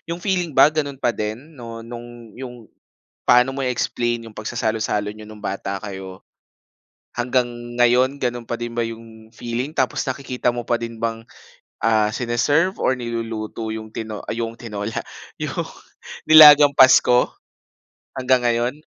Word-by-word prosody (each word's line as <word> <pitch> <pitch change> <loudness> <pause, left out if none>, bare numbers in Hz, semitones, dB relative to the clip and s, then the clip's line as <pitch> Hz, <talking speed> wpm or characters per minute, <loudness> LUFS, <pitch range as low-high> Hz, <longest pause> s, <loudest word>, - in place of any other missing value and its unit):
'yong 170 +1 -4
feeling 180 -6 -1
ba 150 - +7
gano'n 145 -3 -2
pa 120 -3 0
din 105 0 -3 0.2
no'ng, 120 -2 -10
'yong 125 -2 -9 0.6
paano 125 +2 +4
mo 135 - -3
i-explain 120 -2 -1
'yong 110 - -14
pagsasalo-salo 110 -2 -2
n'yo 110 - -11
no'ng 105 0 -12
bata 100 0 -4
kayo, 95 -2 -8 1.0
hanggang 125 +1 +1 0.3
ngayon 125 +3 +3
ganun 120 -2 -2
pa 115 0 -5
din 120 0 -5
ba 120 - 0
yung 115 -1 -9
feeling 120 +3 -4
tapos 130 -6 0
nakikita 130 -2 -2
mo 120 -1 -5
pa 120 - +1
din 115 -1 -4
bang, 115 0 -3 0.6
ah, 110 -1 +2
sineserve 145 - +1
or - - +1
niluluto 115 -2 -4
yung 110 0 -6
tino 110 -1 -6
ah, - - -5
yung 115 -1 -3
tinola. 105 -1 -4 0.4
Yung - - -3 0.6
nilagang 150 -2 +9
Pasko, 125 -1 +5 0.8
hanggang 130 -2 +2
ngayon? 120 +5 -1
120 Hz, 140 wpm, -21 LUFS, 110-130 Hz, 1.0 s, nilagang